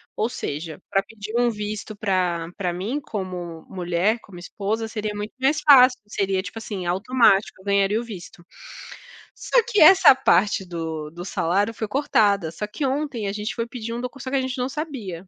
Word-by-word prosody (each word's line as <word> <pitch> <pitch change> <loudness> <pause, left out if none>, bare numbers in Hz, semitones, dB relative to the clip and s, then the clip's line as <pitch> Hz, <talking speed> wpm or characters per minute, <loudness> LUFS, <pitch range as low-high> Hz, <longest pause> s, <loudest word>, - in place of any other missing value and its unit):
ou 220 - 0
seja, 155 - -5
para 195 - +2
pedir 215 +1 -9
um 240 0 +3
visto 210 0 -5
pra 180 -5 -1
pra 180 -3 -1
mim 215 +12 -3
como 180 - -6
mulher, 180 +4 0
como 190 -4 -13
esposa, 210 +5 -3
seria 215 -1 -4
muito 210 +1 -5
mais 290 +3 +2
fácil, 260 -4 +7
seria, 195 -2 -1
tipo 200 +4 -7
assim, 205 -5 -6
automático, 200 +1 +2
eu - - -20
ganharia 200 +1 +2
o - - -7
visto. 190 -5 -10 0.9
Só - - +2
que 475 -4 +2
essa 375 -1 +9
parte 205 -6 +2
do 160 -3 -5
do 175 +2 -8
salário 200 +5 0
foi 220 0 -4
cortada. 205 - +2
Só 210 +6 -5
que 225 +7 -4
ontem 270 -5 -2
a 195 - -2
gente 210 +1 -4
foi 230 - -2
pedir 230 -1 -6
um 240 - -4
docu 250 +2 -6
só 260 - -5
que - - 0
a - - +1
gente 260 +1 -4
não 250 +1 -1
sabia, 245 - -6
210 Hz, 195 wpm, -23 LUFS, 185-245 Hz, 0.9 s, essa